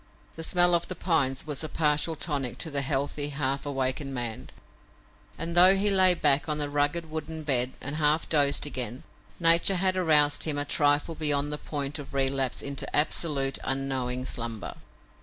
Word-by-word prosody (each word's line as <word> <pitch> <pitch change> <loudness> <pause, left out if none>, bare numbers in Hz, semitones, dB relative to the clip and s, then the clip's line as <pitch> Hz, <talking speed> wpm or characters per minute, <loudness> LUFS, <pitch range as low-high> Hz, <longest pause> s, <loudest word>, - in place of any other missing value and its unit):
The 165 - -7
smell 175 +1 +3
of 170 -1 +1
the - - -5
pines 140 -7 0
was 150 -1 -3
a 155 - -4
partial 150 +1 0
tonic 140 -6 -3
to 160 - -4
the 140 -1 -1
healthy, 140 +1 -2
half 140 0 -2
awakened 135 0 -3
man, 120 -3 -5 0.9
and, 165 +1 -4
though 180 +2 +7
he 200 +1 +2
lay 185 -2 +5
back 145 -3 +1
upon 150 -2 -1
the 145 -1 -3
rugged 145 +3 -1
wooden 160 0 -6
bed 130 -3 0
and 140 +3 -5
half 155 +1 +1
dozed 145 -3 +2
again, 125 -3 -4 0.4
nature 170 +3 +5
had 185 +1 0
aroused 150 -5 +3
him 150 -2 -1
a 145 - -1
trifle 145 +2 +1
beyond 145 -2 0
the 150 - -3
point 145 0 -4
of 140 -1 -10
relapse 135 -1 0
into 140 -1 -3
absolute, 145 -2 +1
unknowing 130 -2 -2
slumber. 115 -5 -3
145 Hz, 175 wpm, -26 LUFS, 135-160 Hz, 0.9 s, though